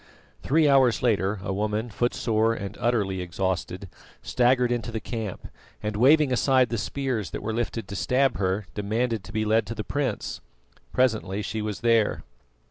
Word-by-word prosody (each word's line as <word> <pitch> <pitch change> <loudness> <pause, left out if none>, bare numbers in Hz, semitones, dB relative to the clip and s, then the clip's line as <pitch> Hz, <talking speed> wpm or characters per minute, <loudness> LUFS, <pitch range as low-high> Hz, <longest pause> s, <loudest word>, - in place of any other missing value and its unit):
Three 155 +2 +3
hours 135 -5 +4
later 105 -4 +1
a 95 - -2
woman, 105 +3 -2
footsore 115 0 +1
and 100 -2 -6
utterly 105 -6 0
exhausted, 90 0 -3 0.4
staggered 125 0 +2
into 120 -1 -2
the 110 - -3
camp, 110 -4 -5 0.4
and 105 0 -2
waving 140 +4 +5
aside 130 0 +3
the 115 - -2
spears 130 -9 -2
that - - -6
were 110 +1 -2
lifted 115 -2 -3
to 100 - -6
stab 130 +6 +1
her, 95 +1 -1
demanded 110 +1 -1
to 100 - -10
be 110 0 -1
led 110 0 +2
to 115 - -5
the 110 - -4
prince. 135 -5 -3 0.5
Presently 110 -5 +1
she 110 +1 -3
was 105 -2 -4
there. 115 -2 +2
110 Hz, 165 wpm, -26 LUFS, 105-125 Hz, 0.5 s, waving